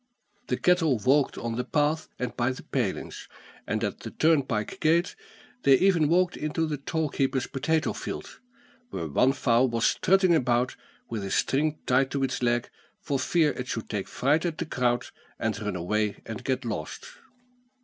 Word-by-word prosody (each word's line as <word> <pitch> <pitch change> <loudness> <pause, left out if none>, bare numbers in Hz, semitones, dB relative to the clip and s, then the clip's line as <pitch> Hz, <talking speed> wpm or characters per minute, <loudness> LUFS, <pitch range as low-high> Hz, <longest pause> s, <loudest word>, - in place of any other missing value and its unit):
The - - 0
cattle 165 -7 +3
walked 135 +6 +2
on 115 -1 -3
the 125 - 0
path 150 +3 0
and 125 -1 -4
by 125 +2 +1
the - - -10
palings, 120 -9 -3 0.4
and - - -1
at - - -2
the - - -7
turnpike 140 -9 +1
gate 170 +3 +2 0.5
they 135 - +6
even 170 -1 +3
walked 180 +1 +3
into 155 +2 -1
the 155 -2 -2
toll 155 +2 -2
keeper's 135 -2 0
potato 160 +4 0
field, - - -7 0.5
where 85 - -4
one 105 - +3
fowl 130 -2 +3
was 115 -1 0
strutting 185 -1 +3
about 125 -4 +1 0.3
with 110 -3 -4
a 95 - -4
string 150 +9 +1
tied 130 +1 +3
to 140 -1 -1
its 130 -1 -1
leg, 120 0 0 0.3
for 140 -2 -2
fear 155 +2 +2
it 125 -2 -6
should 115 - -4
take 100 -2 -2
fright 145 +5 +1
at 170 -3 -2
the - - -3
crowd, 125 -4 0 0.3
and 110 -1 -2
run 105 -3 -2
away 105 +4 -1
and 110 -1 -6
get 130 -1 -1
lost. 105 -9 -5
135 Hz, 175 wpm, -27 LUFS, 120-155 Hz, 0.5 s, they